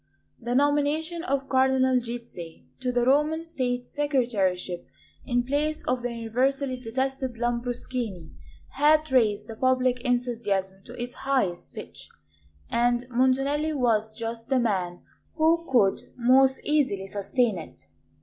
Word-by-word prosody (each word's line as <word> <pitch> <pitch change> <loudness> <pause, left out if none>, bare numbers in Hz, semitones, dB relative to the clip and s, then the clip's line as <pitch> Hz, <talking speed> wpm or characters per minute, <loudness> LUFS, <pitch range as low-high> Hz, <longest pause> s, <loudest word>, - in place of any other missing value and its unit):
The 240 +1 -2
nomination 295 +4 +1
of 275 -5 -1
Cardinal 260 -1 +3
Gizzi 235 -9 -8
to 255 -1 -1
the 245 -1 +1
Roman 300 +5 +2
State 250 -6 -2
Secretaryship 215 - -1 0.4
in 245 -1 +1
place 295 +4 -1
of 250 0 0
the 245 0 -2
universally 255 +4 0
detested 260 +1 -3
Lambruschini 240 -5 -3 0.4
had 305 +2 +3
raised 215 -5 +2
the 225 - -7
public 255 0 +2
enthusiasm 225 -6 -1
to 245 +1 -11
its 245 +1 -4
highest 255 -12 -1
pitch; - - -9 0.6
and 240 +1 +1
Montanelli 270 +5 +2
was 220 -5 +1
just 230 +1 -5
the 265 -1 +3
man 185 -7 -1 0.3
who 330 +1 +2
could 205 -7 +2
most 260 +2 +4
easily 270 -11 +1
sustain 205 +1 0
it. 160 - -12
250 Hz, 125 wpm, -26 LUFS, 230-270 Hz, 0.6 s, most